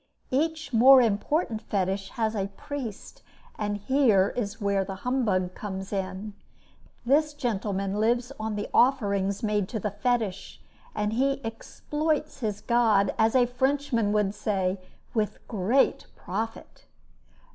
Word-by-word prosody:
Each 310 +2 -1
more 260 +4 +8
important 230 - 0
Fetish 195 0 -2
has 220 -1 +1
a 195 -3 -1
priest, 265 -8 -7 0.3
and 205 -1 -2
here 210 -4 +3
is 205 -5 -3
where 200 -1 +1
the 190 0 -6
humbug 205 -8 +1
comes 190 -1 -6
in. 190 +2 -4 0.7
This 295 +4 +2
gentleman 200 -6 -2
lives 240 +3 +1
on 215 0 -3
the 205 - -3
offerings 200 -6 +2
made 210 -2 0
to 220 - -3
the 210 +1 -2
Fetish, 210 -2 -2 0.4
and 210 0 -1
he 270 +4 +1
"exploits" 300 +7 -3
his 210 -4 -3
god, 225 -5 +3
as 220 +2 +3
a 250 -1 +5
Frenchman 250 -3 0
would 210 -2 +1
say, 195 -3 -1 0.3
with 215 -2 -1
great 225 +5 +1
profit. 225 0 -6
215 Hz, 130 wpm, -27 LUFS, 200-250 Hz, 0.7 s, more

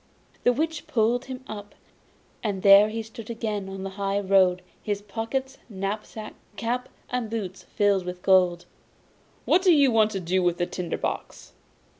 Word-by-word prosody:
The 245 - +4
Witch 315 +5 -2
pulled 235 +1 +1
him 260 0 -7
up, 205 -3 -8 0.7
and 200 -4 -2
there 200 +1 +8
he 225 +1 -4
stood 225 0 -10
again 215 -4 -3
on 195 0 -6
the 195 - -4
high 195 0 +1
road, 190 -2 +3 0.2
with 205 0 -3
pockets, 260 +6 -3
knapsack, 210 +2 -5 0.2
cap 245 +2 -2 0.2
and 245 -3 -2
boots 200 -4 -5
filled 200 -2 +3
with 180 0 -6
gold. 180 -2 +4 0.8
'What 360 - +4
do 370 -1 +5
you 285 -5 +5
want 220 -1 +4
to 195 - -2
do 185 +1 0
with 175 -1 +1
the 175 - +1
tinder 175 -1 -4
box? - - -5
210 Hz, 165 wpm, -26 LUFS, 190-230 Hz, 0.8 s, there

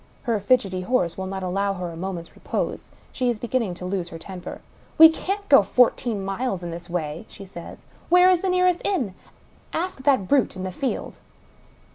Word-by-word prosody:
Her 230 -4 0
fidgety 200 -4 +1
horse 185 -5 0
will 190 0 -4
not 190 0 -4
allow 195 +2 0
her 180 -2 -5
a - - -9
moment's 175 -1 -5
repose; - - -4 0.2
she 250 -1 0
is 235 - 0
beginning 230 -5 -1
to 180 - -7
lose 180 -2 -2
her 165 - -8
temper. 180 +2 -8 0.2
" - - -30
We 320 0 +11
can't 395 +5 -3
go 275 - +8
fourteen 230 -1 +2
miles 195 -1 -2
in 170 - -4
this 170 +1 -8
way," 165 +2 -3
she 195 - -11
says. 175 -3 -11
*' - - -28
Where 360 +1 +7
is 365 -2 +4
the 385 - 0
nearest 365 -1 +2
inn? 265 - -1 0.6
Ask 350 -4 -3
that 260 -8 +2
brute 275 -4 +2
in 185 - -6
the 185 - -3
field 265 +8 -4
200 Hz, 200 wpm, -24 LUFS, 180-265 Hz, 0.6 s, We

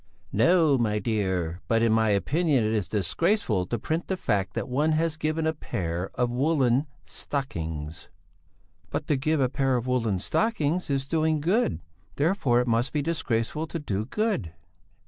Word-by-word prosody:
"No, 145 - +4
my 105 -3 +1
dear; 95 -5 -1
but 115 0 +2
in 115 -1 +3
my 110 -1 +3
opinion 140 - +2
it 110 +1 0
is 105 -6 0
disgraceful 105 - 0
to 120 - -1
print 160 +9 -2
the 190 - -1
fact 100 - -1
that - - -2
one 150 +5 +1
has 160 0 +1
given 155 +1 -1
a 160 - +1
pair 90 - -3
of 125 -2 0
woollen 135 0 +2 0.2
stockings...." 80 - -5 0.8
"But - - -3
to 150 - +1
give 155 +3 0
a 130 - +3
pair 135 0 0
of 120 - -3
woollen 115 -6 +1
stockings 170 - 0
is 135 -1 0
doing 155 +1 +1
good; 170 - +1 0.3
therefore 145 -6 +2
it 125 - -3
must 115 +2 +1
be 150 -2 0
disgraceful 150 -1 -1
to 165 - -4
do 110 -9 -3
good...." 195 - -1
130 Hz, 165 wpm, -26 LUFS, 110-155 Hz, 0.8 s, No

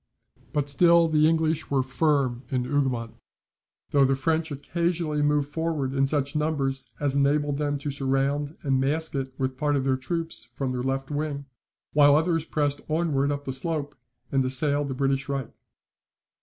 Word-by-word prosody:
But 145 -1 0
still 170 +3 +5
the 155 -1 +4
English 160 -1 +1
were 135 -2 +2
firm 135 -2 +1
in 130 -2 0
Hougoumont; 125 -4 -1 0.8
though 140 - +5
the 135 0 +3
French 160 +4 0
occasionally 160 +1 -1
moved 145 -1 +2
forward 155 -4 -2
in 135 0 +2
such 140 0 0
numbers 135 -5 -1
as 145 -2 0
enabled 140 +1 +1
them 145 -1 0
to 140 +1 -4
surround 140 +2 -1
and 135 -3 +1
mask 155 +4 -1
it 135 -1 -3
with 130 -1 -2
part 145 0 +1
of 135 - 0
their 130 -1 +1
troops 165 +4 -4
from 135 -2 -2
their 125 -1 -2
left 135 +2 -2
wing, 145 -1 -3 0.5
while 145 -1 +6
others 165 0 +1
pressed 145 -2 -1
onward 155 -3 +1
up 145 0 -3
the 130 - -4
slope, 145 +1 -3 0.4
and 135 -1 +2
assailed 145 +2 +2
the 130 - -4
British 135 +1 0
right. 135 -4 -3
145 Hz, 170 wpm, -26 LUFS, 135-155 Hz, 0.8 s, while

